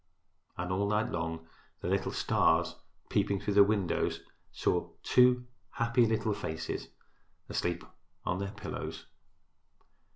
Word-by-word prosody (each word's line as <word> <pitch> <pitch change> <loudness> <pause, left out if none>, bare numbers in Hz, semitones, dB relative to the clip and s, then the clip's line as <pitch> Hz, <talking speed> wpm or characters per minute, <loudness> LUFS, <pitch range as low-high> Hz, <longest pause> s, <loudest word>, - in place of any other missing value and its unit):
And 90 +1 -3
all 100 +2 +1
night 105 +1 +1
long 80 -1 -3 0.3
the - - -3
little - - +1
stars - - +2 0.3
peeping 100 -1 +1
through 100 +1 -1
the 100 0 +8
windows 100 -4 0 0.3
saw - - 0
two 125 0 +5 0.3
happy 115 0 +3
little 110 -1 +1
faces 80 -4 -4 0.6
asleep 85 -1 -1 0.4
upon 90 - -1
their 100 0 -2
pillows. - - -6
100 Hz, 120 wpm, -31 LUFS, 90-110 Hz, 0.6 s, the